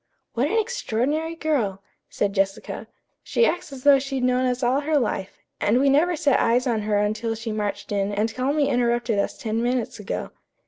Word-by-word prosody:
"What 250 +4 +1
an 445 - 0
extraordinary 320 - -1
girl!" 235 -13 -1 0.3
said 200 -1 -1
Jessica. 195 0 -2 0.3
"She 470 - +2
acts 350 - -1
as 265 -2 -9
though 285 -1 +7
she'd 270 -1 -3
known 250 0 +2
us 250 +1 -1
all 250 +3 +3
her 300 +1 +1
life, 210 -7 -2 0.2
and 225 +4 +2
we 275 0 +4
never 335 +5 +3
set 295 -3 +2
eyes 245 +3 +2
on 230 -4 0
her 210 0 0
until 215 +2 0
she 225 0 -5
marched 210 -1 -3
in 200 0 0
and 215 +2 -1
calmly 280 +4 +1
interrupted 240 -4 +1
us - - -1
ten 225 0 -2
minutes 245 -2 -1
ago." 205 - -4
245 Hz, 190 wpm, -24 LUFS, 215-280 Hz, 0.3 s, though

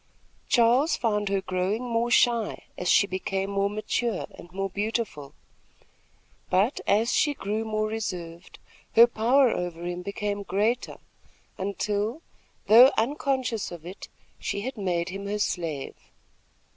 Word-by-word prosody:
Charles 245 +6 +4
found 210 -3 0
her 195 -1 0
growing 190 +5 -1
more 235 -1 0
shy, 235 -2 +2
as 180 - -2
she - - +5
became 195 0 -3
more 200 0 +1
mature 215 +1 -2
and 175 - -13
more 195 +1 -2
beautiful; 205 -7 -3 1.1
but 200 +9 +2
as 220 +4 +2
she 290 -1 +2
grew 215 0 -2
more 215 -1 -1
reserved, 180 -6 -5 0.4
her 230 - +10
power 240 +3 +3
over 175 -1 -4
him 175 0 -4
became 200 +2 -3
greater, 210 +5 -1 0.6
until, 205 - -2 0.4
though 235 +6 +8
unconscious 255 - -1
of 170 -2 -9
it, 185 +3 -9 0.3
she 200 - -3
had 260 +4 -4
made 180 -5 -1
him 195 +2 -6
her 205 +1 -2
slave. 165 -8 -2
205 Hz, 130 wpm, -26 LUFS, 190-230 Hz, 1.1 s, her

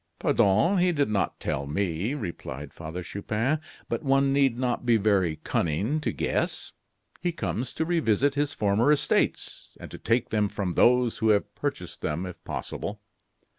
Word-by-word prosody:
"Pardon! 110 - +3
he 180 0 +3
did 145 -6 +1
not 100 -3 0
tell 70 +1 -2
me," 95 - -1
replied 80 - -6
Father 85 +2 -6
Chupin; 110 - -1 0.3
"but 115 - -2
one 135 0 +3
need 135 -4 +3
not 125 -1 -1
be 120 -2 +4
very 100 -6 +2
cunning 100 - 0
to - - -1
guess. - - -2 0.5
He 175 - 0
comes 130 -7 -3
to 160 - -1
revisit 145 - +2
his 145 0 0
former 105 +7 +3
estates, 150 - 0
and - - -9
to - - -8
take 115 +1 +1
them 105 -2 +1
from 95 -4 -3
those 125 +2 +3
who 110 - +2
have 105 -1 +2
purchased - - -4
them, 85 +5 -2
if 90 -2 -9
possible. - - -5
115 Hz, 165 wpm, -27 LUFS, 95-140 Hz, 0.5 s, be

